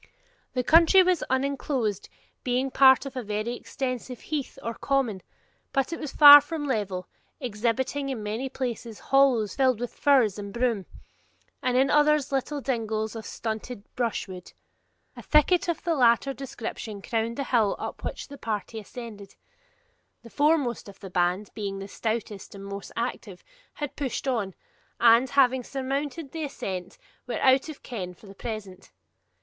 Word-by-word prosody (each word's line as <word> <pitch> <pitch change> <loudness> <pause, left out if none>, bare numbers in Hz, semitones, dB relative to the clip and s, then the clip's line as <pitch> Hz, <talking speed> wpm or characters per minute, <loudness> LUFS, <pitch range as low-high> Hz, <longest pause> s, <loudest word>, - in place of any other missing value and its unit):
The 250 - 0
country 335 +6 +6
was 365 -2 +1
uninclosed, 260 -5 -1 0.3
being 255 +1 0
part 265 0 +6
of 270 -1 -7
a 255 - -2
very 215 +2 -3
extensive 255 -2 -5
heath 295 -3 -4
or 230 - -3
common; 245 -6 -1 0.5
but 275 +4 0
it - - -5
was 300 - -5
far 290 -1 +11
from 295 0 -5
level, 200 -8 -2 0.3
exhibiting 250 +3 -1
in 240 -5 -4
many 220 +6 -3
places 240 -4 -4
hollows 260 -7 +3
filled 260 -4 +2
with 245 -1 -4
furze 245 -8 +3
and 200 0 -6
broom; 235 -4 -1 0.7
in 255 +2 +2
others, 300 -1 +3
little 275 +2 -1
dingles 220 -4 -2
of 225 - -7
stunted 220 0 -5
brushwood. 195 -6 -3 0.6
A - - -9
thicket 320 +4 +3
of 335 -2 -2
the 340 - +1
latter 250 0 +3
description 230 -6 -7
crowned 230 0 -2
the 280 - -1
hill 225 -6 +2
up - - -6
which - - -5
the 280 -1 -11
party 220 0 -4
ascended. 210 -2 -10 0.9
The 230 - -13
foremost 290 -8 +1
of 195 - -14
the 195 -3 -9
band, 180 +3 0
being 200 -2 -4
the 195 0 -6
stoutest 215 -2 -4
and 195 0 -9
most 200 0 -7
active, 230 -5 -4 0.3
had 295 -2 -5
pushed 275 -1 -3
on, 215 -8 -1 0.4
and, 235 +2 +6
having 260 -2 +3
surmounted 275 +3 -4
the 325 -1 -4
ascent, 190 -10 -5 0.3
were 245 - -2
out 265 +3 +4
of 305 - -10
ken 185 -7 -6
for 210 - -18
the 195 - -11
present. 195 -3 -7
245 Hz, 155 wpm, -26 LUFS, 215-275 Hz, 0.9 s, far